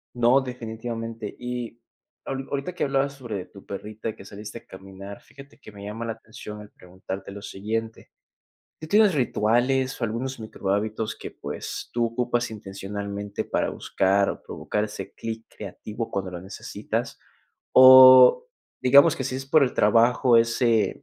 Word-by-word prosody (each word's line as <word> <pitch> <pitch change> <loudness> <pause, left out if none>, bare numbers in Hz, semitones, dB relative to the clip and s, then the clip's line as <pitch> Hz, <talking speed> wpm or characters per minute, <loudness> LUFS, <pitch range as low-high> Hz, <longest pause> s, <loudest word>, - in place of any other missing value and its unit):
No, 120 +3 +4
definitivamente. 115 -3 -6
Y 125 -1 -6 0.4
ahor 135 0 -4
ahorita 140 +5 -3
que - - -3
hablabas 135 0 0
sobre 115 -9 -6
tu 100 - -16
perrita 105 +2 -6
que 95 - -13
saliste 105 +3 -9
a - - -28
caminar, 95 +1 -11
fíjate 140 0 -16
que 110 - -13
me 100 -1 -12
llama 110 +3 -5
la 115 - -3
atención 110 -1 -10
el 105 - -13
preguntarte 95 +1 -9
lo 100 +1 -9
siguiente, 110 +3 -5 0.7
¿tú 155 - -8
tienes 205 +2 +4
rituales 130 +1 +1
o - - 0
algunos 120 +4 -3
microhábitos 110 0 -3
que, - - -8
pues, - - -7
tú 120 0 +1
ocupas 120 0 -1
intencionalmente 100 0 -6
para - - -1
buscar 100 +1 +1
o - - -5
provocar 105 - -3
ese 105 -1 -8
clic 115 0 -6
creativo 105 +3 -7
cuando 95 -1 -3
lo 85 - -6
necesitas? 95 - -5 0.5
O, 130 - +9 0.4
digamos 140 +5 +6
que, 130 - -4
si 130 - -3
es 135 - -6
por 150 +2 +4
el 130 - +1
trabajo, 115 +3 +4
ese 115 -2 +2
115 Hz, 155 wpm, -25 LUFS, 105-130 Hz, 0.7 s, O